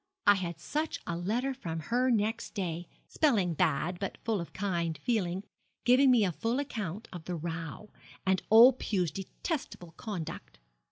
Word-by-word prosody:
I 205 - +8
had 180 -3 -3
such 305 +1 -2
a 170 - -2
letter 230 +10 -1
from 165 -11 -5
her 245 +10 +1
next 220 -2 0
day 175 -4 -3 0.2
spelling 210 - +2
bad, 165 +2 +1
but 195 - -4
full 220 -5 0
of 170 - -8
kind 170 -5 -1
feeling 190 0 -1 0.4
giving 260 +2 +6
me 240 -5 +5
a 180 - +1
full 230 +8 -1
account 220 - -4
of 170 -3 -8
the 180 - -3
row, 165 +4 -5 0.3
and 190 -1 +2
old 240 +4 +8
Pew's 180 -7 0
detestable 195 - -5
conduct. 190 -8 -6
195 Hz, 160 wpm, -31 LUFS, 170-235 Hz, 0.4 s, I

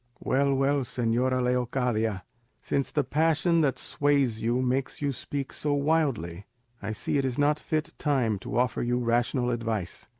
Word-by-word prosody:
"Well, 140 +1 +1
well, 140 +1 +2
señora 125 0 0
Leocadia, 125 -5 0 0.4
since 140 - -1
the 145 - 0
passion 165 +4 +2
that 135 -4 +1
sways 140 -6 +1
you 120 +2 +1
makes 130 +1 -1
you 145 -1 0
speak 140 +1 -5
so 145 -1 0
wildly, 140 - 0 0.3
I - - -3
see 110 +6 -1
it - - 0
is 125 -2 -2
not 145 +1 +3
the - - -15
fit 155 -1 -1
time 125 -8 +1
to - - -4
offer 125 -1 +1
you 120 +1 0
rational 120 +1 +1
advice. 115 -7 -3
130 Hz, 165 wpm, -27 LUFS, 120-145 Hz, 0.4 s, not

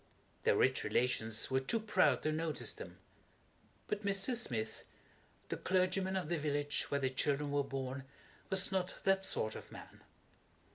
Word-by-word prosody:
Their - - +5
rich - - +3
relations 115 -2 0
were 130 - +3
too 135 - 0
proud 185 - +3
to 155 - +1
notice 155 0 -1
them. - - -10 0.9
But 210 0 -2
Mr. 200 +5 +2
Smith, 115 - -1 0.7
the - - -2
clergyman 185 +1 +1
of 185 -4 -1
the 170 0 0
village 145 -1 -1
where 140 - +1
the 130 -1 0
children 145 +2 0
were 145 0 +2
born, 135 -1 -4 0.4
was 190 -1 +4
not 185 -1 -1
that 195 0 +3
sort 110 -11 +1
of - - -9
a - - -14
man. - - -12
150 Hz, 160 wpm, -35 LUFS, 135-190 Hz, 0.9 s, Their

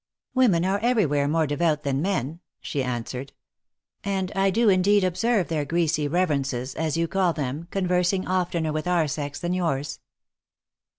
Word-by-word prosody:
" - - -70
Women 205 -10 +3
are 195 +2 +1
everywhere 200 - +2
more 160 +2 +2
devout 150 0 0
than 140 -1 0
men," 165 -4 -2 0.2
she 140 - -3
answered; 125 +2 -4 0.4
" - - -65 0.3
and 190 -2 -2
I 195 0 +3
do 225 +4 +2
indeed 200 +1 +4
observe 195 +2 +1
their 155 -3 -1
greasy 155 0 0
reverences, 140 -6 -1
as 160 0 -2
you 165 0 +1
call 185 -1 +1
them, 145 +3 -4
conversing 180 0 0
oftener 175 -4 0
with 155 +3 -3
our 175 -3 +2
sex 145 0 -4
than 175 +1 -2
yours." 160 -6 -2
170 Hz, 165 wpm, -25 LUFS, 145-185 Hz, 0.4 s, indeed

